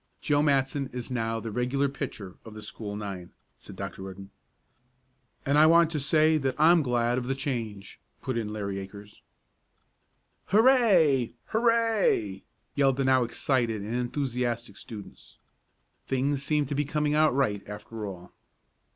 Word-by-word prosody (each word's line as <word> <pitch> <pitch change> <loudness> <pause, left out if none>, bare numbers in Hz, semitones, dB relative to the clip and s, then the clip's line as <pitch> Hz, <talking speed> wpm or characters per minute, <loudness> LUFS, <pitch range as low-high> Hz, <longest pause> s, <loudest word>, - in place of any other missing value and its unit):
"Joe 145 -1 +2
Matson 140 -1 +1
is 125 +1 -6
now 115 -2 -1
the 115 -1 -6
regular 125 +5 0
pitcher 105 -8 -6
for - - -10
the 110 0 -10
school 105 -1 -6
nine," 100 -4 -7 0.3
said 100 - -11
Dr. 100 0 -6
Rudden. 95 +1 -9 1.1
"And 140 +2 +3
I 155 - +7
want 165 0 +5
to 155 - -1
say 155 +2 +3
that 135 -2 -1
I'm 165 +2 +6
glad 120 -2 +1
of 125 - -6
the 135 - 0
change," 115 -8 -5 0.2
put 130 - -4
in 110 -3 -2
Larry 100 -2 -4
Akers. 100 +1 -11 1.3
"Hurray! 195 - +4 0.2
Hurray!" 225 - +2 0.3
yelled 135 -2 +2
the 135 - 0
now 130 -1 +4
excited 120 -3 -1
and 110 +3 -5
enthusiastic 120 -3 -2
students. 105 -3 -11 0.7
Things 135 +1 0
seemed 150 0 0
to - - -2
be 145 - +1
coming 150 0 -1
out 155 -3 +3
right 105 -8 +1
after 105 +1 -7
all. 90 -2 -10
125 Hz, 150 wpm, -27 LUFS, 105-145 Hz, 1.3 s, I